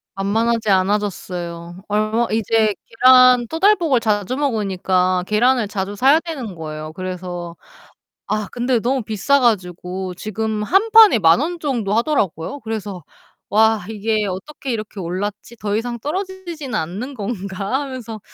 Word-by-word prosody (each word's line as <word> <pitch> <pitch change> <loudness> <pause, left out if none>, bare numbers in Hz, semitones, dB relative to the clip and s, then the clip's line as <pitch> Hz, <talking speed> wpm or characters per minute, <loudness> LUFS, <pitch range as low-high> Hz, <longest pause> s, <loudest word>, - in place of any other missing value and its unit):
만만하지 220 +3 0
않아졌어요. 185 -3 -2
얼마 215 +3 +1
이제 220 -1 +2
계란 255 0 +6
토달볶을 330 - +3
자주 215 +1 -1
먹으니까 190 -8 0
계란을 235 +2 +2
자주 200 0 -4
사야 275 +8 +5
되는 285 - -6
거예요. 155 -1 -7
그래서 180 -1 -6 0.7
아 215 -1 -1
근데 245 0 +1
너무 255 +3 0
비싸 220 +6 +1
가지고 185 -4 -1
지금 215 +2 -3
1 390 - +2
판에 440 - +8
10,000 165 +4 +5
원 345 +3 -2
정도 235 -9 -1
하더라고요. 230 - -1
그래서 210 -6 -5 0.5
'와 220 -1 +3
이게 215 0 -1
어떻게 255 +9 -6
이렇게 215 -3 -4
올랐지? 205 +6 -5
더 210 -1 -2
이상 235 +1 -3
떨어지지는 345 - -5
않는 205 - -5
건가?' 200 +1 -3
하면서 250 -6 -7
215 Hz, 300 characters per minute, -20 LUFS, 190-255 Hz, 0.7 s, 판에